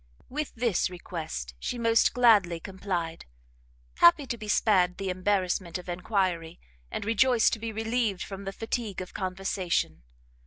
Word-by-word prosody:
With 300 Hz, +3 st, -4 dB
this 230 Hz, -6 st, +1 dB
request 160 Hz, -, -6 dB
she 245 Hz, -, -3 dB
most 230 Hz, -1 st, +3 dB
gladly 210 Hz, -9 st, +5 dB
complied, 180 Hz, -, -4 dB, 0.7 s
happy 170 Hz, +12 st, +6 dB
to 240 Hz, -, -3 dB
be 215 Hz, -2 st, -9 dB
spared 185 Hz, -4 st, +3 dB
the 195 Hz, -1 st, -2 dB
embarrassment 185 Hz, -1 st, 0 dB
of 180 Hz, -, -11 dB
enquiry, 175 Hz, -2 st, -1 dB, 0.3 s
and -, -, -4 dB
rejoiced 230 Hz, +2 st, +4 dB
to 225 Hz, -, -2 dB
be 225 Hz, 0 st, -4 dB
relieved 225 Hz, -3 st, -1 dB
from 195 Hz, 0 st, -8 dB
the 195 Hz, -, -3 dB
fatigue 225 Hz, -1 st, -3 dB
of 185 Hz, -, -7 dB
conversation. 185 Hz, -, -2 dB
195 Hz, 145 wpm, -28 LUFS, 180-225 Hz, 0.7 s, happy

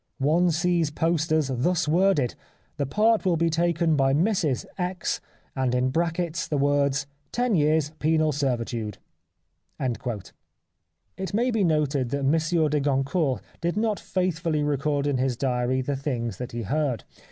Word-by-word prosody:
One 160 Hz, +6 st, +3 dB
sees 170 Hz, -1 st, +1 dB
posters 155 Hz, -2 st, +1 dB
thus 170 Hz, +7 st, +1 dB
worded: 165 Hz, -6 st, +3 dB, 0.2 s
' -, -, -39 dB
The 140 Hz, -2 st, -1 dB
part 215 Hz, +8 st, +3 dB
will 180 Hz, -4 st, +2 dB
be 165 Hz, +1 st, +1 dB
taken 165 Hz, -1 st, +2 dB
by 135 Hz, -1 st, +3 dB
Mrs 165 Hz, -, +1 dB
X./ 180 Hz, 0 st, -2 dB, 0.4 s
and, 130 Hz, -2 st, 0 dB
in 125 Hz, +1 st, +1 dB
brackets, 170 Hz, +2 st, -1 dB
the 150 Hz, -, -1 dB
words 140 Hz, 0 st, +2 dB, 0.2 s
' 145 Hz, -, -13 dB
(lo 245 Hz, -, +2 dB
Years 155 Hz, -2 st, +2 dB
Penal 155 Hz, 0 st, +2 dB
Servitude).' 120 Hz, -6 st, -2 dB, 0.4 s
" -, -, -48 dB
It 105 Hz, -, -7 dB
may 245 Hz, +3 st, +2 dB
be 220 Hz, -3 st, +1 dB
noted 150 Hz, -6 st, +1 dB
that 140 Hz, +2 st, -2 dB
Monsieur 160 Hz, +3 st, +2 dB
de 150 Hz, 0 st, +1 dB
Goncourt 135 Hz, -, 0 dB, 0.2 s
did 170 Hz, +3 st, -1 dB
not 215 Hz, -1 st, 0 dB
faithfully 170 Hz, -4 st, -1 dB
record 145 Hz, 0 st, 0 dB
in 140 Hz, -3 st, 0 dB
his 130 Hz, -2 st, 0 dB
diary 125 Hz, 0 st, 0 dB
the 140 Hz, +2 st, -2 dB
things 120 Hz, -7 st, -3 dB
that 125 Hz, +1 st, -6 dB
he 120 Hz, 0 st, -4 dB
heard. 135 Hz, 0 st, -1 dB
150 Hz, 155 wpm, -25 LUFS, 130-170 Hz, 0.4 s, One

